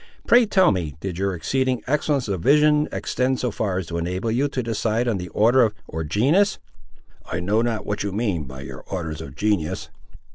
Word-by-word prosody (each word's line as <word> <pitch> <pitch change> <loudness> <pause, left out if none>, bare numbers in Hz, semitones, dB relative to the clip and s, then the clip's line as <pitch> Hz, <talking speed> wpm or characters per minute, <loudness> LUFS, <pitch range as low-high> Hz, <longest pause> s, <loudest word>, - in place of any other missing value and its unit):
Pray 240 -1 +5
tell 190 -2 +4
me, 80 -7 -3
did 90 0 -5
your 95 -1 0
exceeding 130 - -1
excellence 145 -2 0
of 95 -4 -2
vision 150 - +4
extend 130 0 -1
so 125 - -1
far 100 -3 -2
as 95 - -2
to 85 +1 -4
enable 90 +6 -2
you 130 +5 +1
to 130 -3 -3
decide 115 +1 -1
on 110 -5 0
their 90 0 -6
order, 115 0 +4
or 80 0 -4
genus?" 140 - +2 0.7
"I 80 - -1
know 100 +5 +1
not 115 -2 -1
what 105 - -2
you 100 - -2
mean 100 -7 -1
by 65 0 -9
your 70 - -9
orders 80 -5 -4
of 70 -4 -9
genius." 100 -5 -1
105 Hz, 195 wpm, -23 LUFS, 90-130 Hz, 0.7 s, Pray